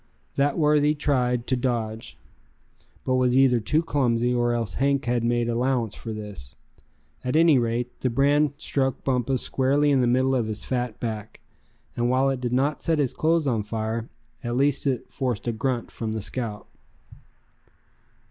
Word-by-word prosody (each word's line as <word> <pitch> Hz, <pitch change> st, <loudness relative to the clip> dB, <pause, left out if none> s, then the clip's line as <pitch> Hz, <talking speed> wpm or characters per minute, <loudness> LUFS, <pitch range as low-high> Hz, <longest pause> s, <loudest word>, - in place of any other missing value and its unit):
That 140 Hz, +1 st, +1 dB
worthy 150 Hz, -1 st, +3 dB
tried 125 Hz, -5 st, 0 dB
to 130 Hz, -, +1 dB
dodge, 115 Hz, -3 st, -3 dB, 0.9 s
but 130 Hz, 0 st, +2 dB
was 125 Hz, 0 st, +2 dB
either 130 Hz, -3 st, +5 dB
too 155 Hz, +9 st, +1 dB
clumsy, 125 Hz, -6 st, +1 dB
or 120 Hz, 0 st, +1 dB
else 115 Hz, -4 st, -2 dB
Hank 140 Hz, 0 st, +2 dB
had 120 Hz, -1 st, 0 dB
made 120 Hz, 0 st, +1 dB
allowances 120 Hz, -2 st, 0 dB
for 115 Hz, -, -5 dB
this. 105 Hz, -, -8 dB, 0.7 s
At 125 Hz, +3 st, -2 dB
any 160 Hz, -4 st, +5 dB
rate, 120 Hz, +1 st, -2 dB
the 130 Hz, -, 0 dB
brand 145 Hz, +4 st, +2 dB
struck 135 Hz, -3 st, -1 dB
Bumpus 130 Hz, 0 st, 0 dB
squarely 140 Hz, +2 st, +2 dB
in 135 Hz, -2 st, +3 dB
the 125 Hz, -, +2 dB
middle 130 Hz, +2 st, +2 dB
of 120 Hz, -4 st, 0 dB
his 105 Hz, -1 st, -3 dB
fat 125 Hz, -4 st, -3 dB
back; 110 Hz, -2 st, -5 dB, 0.6 s
and 120 Hz, 0 st, 0 dB
while 130 Hz, +2 st, +3 dB
it 130 Hz, -2 st, -3 dB
did 120 Hz, -1 st, -2 dB
not 140 Hz, +4 st, +1 dB
set 165 Hz, -1 st, +1 dB
his 140 Hz, -4 st, 0 dB
clothes 165 Hz, 0 st, +1 dB
on 120 Hz, -6 st, +1 dB
fire, 110 Hz, +2 st, -3 dB, 0.3 s
at 120 Hz, 0 st, -2 dB
least 140 Hz, +1 st, +1 dB
it 130 Hz, -3 st, -1 dB
forced 125 Hz, -5 st, -3 dB
a -, -, +2 dB
grunt 120 Hz, +1 st, -2 dB
from 110 Hz, -1 st, -4 dB
the 110 Hz, -, -3 dB
scout. 110 Hz, -4 st, -4 dB
125 Hz, 170 wpm, -25 LUFS, 115-135 Hz, 0.9 s, either